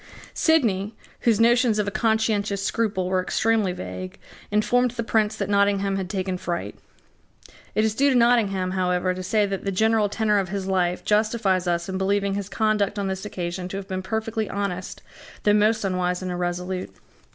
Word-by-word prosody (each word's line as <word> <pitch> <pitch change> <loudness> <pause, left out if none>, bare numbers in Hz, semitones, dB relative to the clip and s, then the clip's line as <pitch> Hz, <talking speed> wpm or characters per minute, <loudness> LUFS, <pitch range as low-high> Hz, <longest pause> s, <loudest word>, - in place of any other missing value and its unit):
Sidney, 220 - +2 0.2
whose 225 -3 +2
notions 235 -1 +4
of 210 -1 0
a - - -1
conscientious 215 -2 0
scruple 205 -4 0
were 185 0 +1
extremely 215 +1 +1
vague, 90 - -7 0.3
informed 245 +4 +2
the 235 0 -4
Prince 215 -1 +1
that - - -3
Nottingham 200 -1 +2
had 190 -2 -3
taken 185 -1 -2
fright. 175 -1 -4 1.0
It 215 - +3
is 220 - +1
due 280 +5 +3
to 265 - +2
Nottingham, 215 -6 +3
however, 185 0 0
to 185 - -6
say 210 +3 +1
that 195 -1 -4
the 195 - -1
general 220 +1 +2
tenor 210 0 +1
of 190 -3 -2
his 195 0 -3
life 180 -2 0
justifies 210 -4 +1
us 170 -1 0
in 190 0 -3
believing 200 +1 +1
his 200 -1 -4
conduct 215 -2 0
on 200 - -1
this 190 +1 -3
occasion 180 -2 -4
to 195 - -5
have 195 -1 -7
been 185 0 -3
perfectly 220 +2 -2
honest, 190 -2 -4 0.4
though 205 - +4
most 215 +1 +3
unwise 180 -1 -1
and 185 - -3
irresolute. 180 +1 -3
200 Hz, 180 wpm, -24 LUFS, 185-220 Hz, 1.0 s, notions